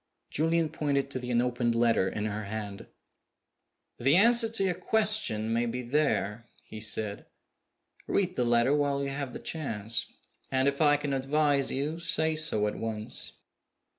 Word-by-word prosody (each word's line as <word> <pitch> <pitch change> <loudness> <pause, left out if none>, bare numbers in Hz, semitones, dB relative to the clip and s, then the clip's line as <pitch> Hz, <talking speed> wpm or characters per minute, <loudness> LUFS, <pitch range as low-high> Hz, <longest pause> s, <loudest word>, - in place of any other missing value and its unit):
Julian 165 +1 +1
pointed 140 -2 -1
to 130 - -3
the 125 0 -7
unopened 120 -1 0
letter 115 -5 +2
in 105 +2 -4
her 105 0 -4
hand. 100 -1 -6 1.1
"The 135 +5 +3
answer 230 +3 +5
to 225 -3 +1
your 185 -2 +1
question 185 - +1
may 120 +1 0
be 125 +2 -4
there," 120 -5 -1 0.2
he 110 - -9
said. 110 -1 -2 0.8
"Read 185 -2 0
the 125 - +1
letter 120 +3 +3
while 140 -1 0
you 140 - -3
have 140 -2 -4
the - - -7
chance. 115 -8 -4 0.4
And 130 0 +1
if 140 +1 0
I 145 -1 +5
can 145 -1 -3
advise 140 +1 +1
you, 150 +5 -2
say 160 -1 +1
so 155 -9 +1
at 105 - -3
once." 110 -1 +2
135 Hz, 160 wpm, -28 LUFS, 115-155 Hz, 1.1 s, answer